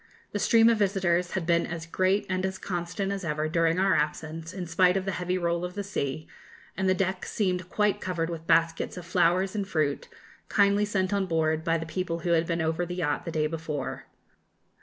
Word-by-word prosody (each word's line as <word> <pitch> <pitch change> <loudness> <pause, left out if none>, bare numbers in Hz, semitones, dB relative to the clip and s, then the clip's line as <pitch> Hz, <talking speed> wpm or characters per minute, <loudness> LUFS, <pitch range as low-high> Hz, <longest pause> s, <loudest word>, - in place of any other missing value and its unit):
The - - -2
stream 225 -1 +5
of 230 -2 +4
visitors 185 -3 +1
had 185 -3 -1
been 170 0 +2
as 165 -1 -5
great 185 +4 +1
and 185 -1 -1
as 190 0 -2
constant 180 +2 -3
as 200 -1 -3
ever 155 -1 -1
during 165 +1 +2
our 190 0 +3
absence, 160 +2 -2
in 185 -2 -5
spite 180 +2 +3
of 190 - -2
the 195 - -1
heavy 180 0 -1
roll 170 -1 0
of 180 +1 -5
the 205 - -3
sea, 155 -6 -3 0.5
and 190 0 0
the 185 - +4
deck 185 0 -1
seemed 185 -3 -1
quite 210 0 +1
covered 175 -3 -1
with 165 -1 -6
baskets 165 +2 +2
of 180 - -7
flowers 180 +3 +2
and 205 -3 -2
fruit, 155 -6 -1 0.4
kindly 200 0 +3
sent 195 -1 0
on 200 -1 +1
board 160 -2 +1
by 165 -1 +2
the 165 - -5
people 170 0 -3
who 175 - -1
had 165 0 +3
been 170 -1 0
over 160 +2 0
the 175 0 -4
yacht 160 -5 -1
the 170 - -3
day 155 -1 0
before. 155 -3 -4
175 Hz, 215 wpm, -27 LUFS, 165-190 Hz, 0.5 s, stream